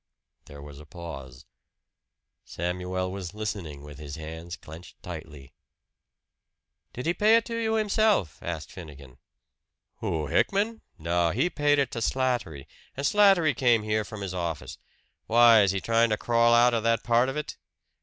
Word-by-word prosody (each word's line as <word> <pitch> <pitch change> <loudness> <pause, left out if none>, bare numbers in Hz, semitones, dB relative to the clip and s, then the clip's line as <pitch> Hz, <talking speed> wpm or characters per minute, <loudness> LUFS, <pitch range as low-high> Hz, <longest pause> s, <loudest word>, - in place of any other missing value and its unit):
There 70 0 -12
was 70 -1 -11
a 75 - -12
pause. 70 -7 -9 1.0
Samuel 90 +1 -3
was 95 0 -7
listening 95 -9 -5
with 75 0 -11
his 75 -1 -7
hands 80 +2 -7
clenched 80 +3 -13
tightly. 80 -5 -9 1.4
"Did 125 - -7
he 170 - +2
pay 215 +4 +4
it 230 - +2
to 230 - -5
you 225 -1 0
himself?" 215 - +1
asked 85 -2 -5
Finnegan. 70 -7 -12 0.8
"Who, 80 -2 -2
Hickman? 205 - 0 0.2
No, 85 +1 0
he 175 - 0
paid 145 -1 +2
it 140 -3 +1
to - - -4
Slattery, 120 - -1 0.3
and 140 - -2
Slattery 195 -7 +4
came 120 -4 +3
here 110 0 0
from 105 0 -9
his 95 -2 -4
office. 85 -4 -5 0.5
Why, 115 -1 +7
is 100 - +3
he 95 +1 0
trying 115 +3 +2
to 105 - 0
crawl 115 +1 +2
out 120 +1 +5
of 115 - +1
that 115 0 +1
part 120 +2 +3
of 135 - -4
it?" 150 -2 -5
100 Hz, 160 wpm, -27 LUFS, 80-130 Hz, 1.4 s, Why